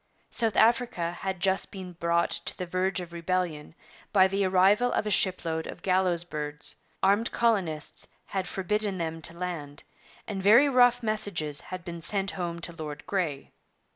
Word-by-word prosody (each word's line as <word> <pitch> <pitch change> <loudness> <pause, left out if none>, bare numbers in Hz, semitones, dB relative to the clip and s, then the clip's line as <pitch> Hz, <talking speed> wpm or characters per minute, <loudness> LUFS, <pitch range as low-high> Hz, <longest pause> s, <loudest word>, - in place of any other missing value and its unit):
South 225 -3 +2
Africa 230 -7 +3
had 190 +1 -4
just 190 +1 +1
been 185 -2 -8
brought 170 0 +1
to - - -1
the 180 - -3
verge 185 +2 0
of 175 -1 -8
rebellion 170 -3 -2 0.4
by 190 -2 +6
the 195 +1 0
arrival 195 +6 +4
of - - 0
a 210 - -1
shipload 165 -5 +1
of - - -9
gallows 185 -2 +2
birds; 150 -3 -3 0.3
armed 200 +4 +3
colonists 195 -10 0 0.2
had 190 -2 -3
forbidden 200 +1 -1
them 165 -1 -3
to 170 +1 -4
land, 160 -5 -5 0.4
and 200 -3 -4
very 230 +9 +7
rough 245 -2 +4
messages 200 -9 -2
had 185 -2 -8
been 170 -1 -6
sent 195 +2 0
home 170 -2 -4
to 170 - -1
Lord 150 -3 -7
Grey. 165 -8 -2
185 Hz, 165 wpm, -28 LUFS, 170-200 Hz, 0.4 s, very